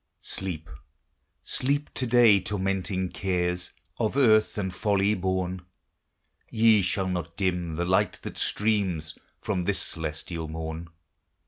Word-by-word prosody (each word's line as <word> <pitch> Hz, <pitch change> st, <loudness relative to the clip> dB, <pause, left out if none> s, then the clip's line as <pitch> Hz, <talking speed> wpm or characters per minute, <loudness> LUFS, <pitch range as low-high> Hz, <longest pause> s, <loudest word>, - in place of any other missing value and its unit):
Sleep, 85 Hz, -5 st, -5 dB, 0.8 s
sleep 145 Hz, +3 st, -1 dB
to 130 Hz, -, -1 dB
day, 115 Hz, -4 st, +6 dB
tormenting 95 Hz, -1 st, -1 dB
cares, 90 Hz, -1 st, -1 dB, 0.3 s
Of 115 Hz, +3 st, 0 dB
earth 110 Hz, -6 st, +4 dB
and 95 Hz, -3 st, -2 dB
folly 100 Hz, +1 st, +2 dB
born; 95 Hz, -1 st, -1 dB, 0.9 s
Ye 110 Hz, -2 st, +5 dB
shall 95 Hz, +1 st, 0 dB
not 85 Hz, -2 st, -3 dB
dim 90 Hz, -4 st, -1 dB
the 85 Hz, +2 st, -1 dB
light 95 Hz, +3 st, +2 dB
that -, -, -6 dB
streams 95 Hz, -8 st, 0 dB, 0.3 s
From 95 Hz, -5 st, -1 dB
this 100 Hz, 0 st, +1 dB
celestial 80 Hz, +1 st, -3 dB
morn. 80 Hz, +1 st, -5 dB
95 Hz, 120 wpm, -27 LUFS, 90-105 Hz, 0.9 s, day